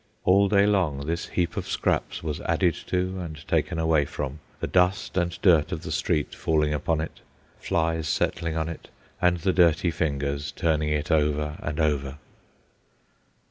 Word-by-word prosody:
All 100 +2 +5
day 100 0 +4
long 85 -9 +1
this 85 +2 -2
heap 85 -2 -1
of - - -4
scraps - - -1
was 75 -2 -3
added - - +2
to 95 +1 -1
and 80 -4 -7
taken 85 - 0
away 80 -2 +2
from, 70 +1 -5 0.2
the - - -2
dust 90 +2 +1
and 85 -2 -1
dirt 85 -7 +5
of 80 - -4
the 80 - -5
street 75 -1 0
falling 75 -2 +1
upon 80 +2 0
it, 80 - -7 0.4
flies 80 -1 0
settling 80 0 -1
on 80 0 -1
it, 85 - -7 0.3
and 90 0 +3
the 90 +3 0
dirty 85 -1 +4
fingers 70 -3 -2
turning 75 -2 0
it 75 +1 -1
over 75 -1 +1
and 75 +1 -4
over. 70 -3 0
80 Hz, 165 wpm, -26 LUFS, 75-85 Hz, 0.4 s, All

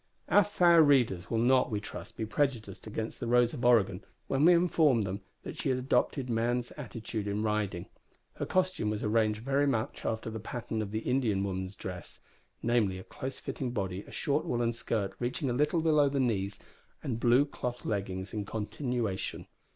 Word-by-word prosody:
Our 205 - +6
fair 175 -4 +5
readers 125 - +3
will 115 - 0
not, 125 +3 +4
we 105 -3 -1
trust, 105 - -8
be 110 - -2
prejudiced 110 -5 -2
against 110 +1 -4
the 120 - -3
Rose 120 0 +4
of 125 - -5
Oregon 105 -5 +3 0.2
when 135 +2 +1
we 175 - +8
inform 160 -8 +3
them 100 0 -3 0.2
that - - -7
she - - -1
had 130 - +2
adopted 130 +1 +1
man's 120 +1 0
attitude 110 -5 -5
in 105 +1 -1
riding. 105 -5 -1 0.5
Her - - -4
costume 185 -12 +1
was 105 -1 -2
arranged 110 0 +1
very 140 +2 +2
much 120 -1 -1
after 110 0 -2
the 110 - -5
pattern 110 0 -4
of 105 - -3
the 110 +2 -2
Indian 115 -6 +1
women's 95 0 -3
dress 90 -2 -7 0.5
namely, 115 -5 +2
a 95 - -8
close 130 +7 -6
fitting 125 -3 -4
body, 95 -4 -2
a - - -12
short 145 +2 0
woollen 120 -7 0
skirt 110 -4 -2
reaching 125 +2 -1
a - - 0
little 150 +6 +2
below 150 -3 +4
the 140 0 -1
knees, 100 -6 0 0.5
and 115 -4 -2
blue 125 +4 +5
cloth 125 -4 -5
leggings 95 -2 -3
in 105 -2 -2
continuation. 110 0 -3
115 Hz, 185 wpm, -30 LUFS, 105-130 Hz, 0.5 s, we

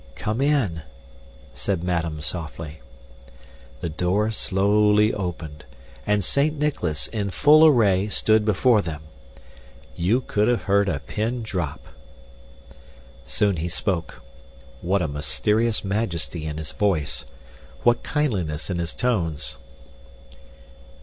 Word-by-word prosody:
"Come 110 +3 -2
in," 135 - +1 0.7
said 85 +6 -2
madame 85 -3 -1
softly. 80 -1 -5 1.0
The 85 - -2
door 95 +7 0
slowly 105 +1 +3
opened, 80 -6 -5 0.4
and 105 -1 +2
Saint 150 +2 +1
Nicholas, 90 - -1
in 105 -3 -3
full 150 - +6
array, 105 -8 +4
stood 110 +1 +2
before 110 +2 +3
them. 80 -4 -6 0.9
You 105 +9 +1
could 105 -4 0
have 120 -1 +1
heard 100 0 +2
a 70 -6 -2
pin 115 +3 -3
drop. 90 -9 -3 1.5
Soon 100 -4 +1
he 85 +3 -2
spoke. 85 - -2 0.6
What 95 +1 +1
a - - 0
mysterious 105 +10 0
majesty 90 -6 -2
in 75 0 -4
his 80 -1 -6
voice! 85 -8 -1 0.6
What 120 -1 +3
kindliness 95 - -1
in 90 - -2
his 85 -2 -3
tones! 85 - -1
100 Hz, 115 wpm, -23 LUFS, 80-110 Hz, 1.5 s, full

